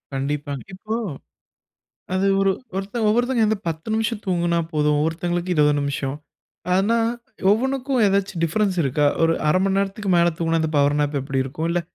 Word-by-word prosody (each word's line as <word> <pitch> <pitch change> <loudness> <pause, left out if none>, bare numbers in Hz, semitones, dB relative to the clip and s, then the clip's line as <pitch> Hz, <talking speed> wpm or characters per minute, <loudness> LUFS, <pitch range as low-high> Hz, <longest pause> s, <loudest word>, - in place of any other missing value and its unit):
கண்டிப்பாங்க. 140 0 -3
இப்போ 215 +4 -4 1.2
அது 190 +1 +1
ஒரு 195 - +3 0.3
ஒருத்தர் 205 +3 -2
ஒவ்வொருத்தங்க 240 +2 +2
வந்து 215 -1 0
10 160 +4 -5
நிமிஷம் 220 -1 -1
தூங்குனா 175 -2 +1
போதும். 150 -1 +2
ஒருத்தங்களுக்கு 175 +2 -1
20 150 -2 +4
நிமிஷம். 140 -1 -2 0.6
அதனா, 200 +5 +3 0.5
ஒவ்வொன்னுக்கும் 260 +3 +1
எதாச்சும் 195 -3 0
டிஃபரன்ஸ் 190 +3 0
இருக்கா? 145 +1 +1 0.2
ஒரு 165 0 +4 0.2
1/2 185 +5 +3
மண் 195 0 +1
நேரத்துக்கு 200 0 -2
மேல 170 0 +4
தூங்குனா, 165 -1 +1
இந்த 160 - -1
பவர் 145 +1 +3
நேப் 145 0 0
எப்பிடி 135 0 -1
இருக்கும்? 155 +5 -3
இல்ல 175 +1 +1
175 Hz, 155 wpm, -22 LUFS, 150-205 Hz, 1.2 s, 20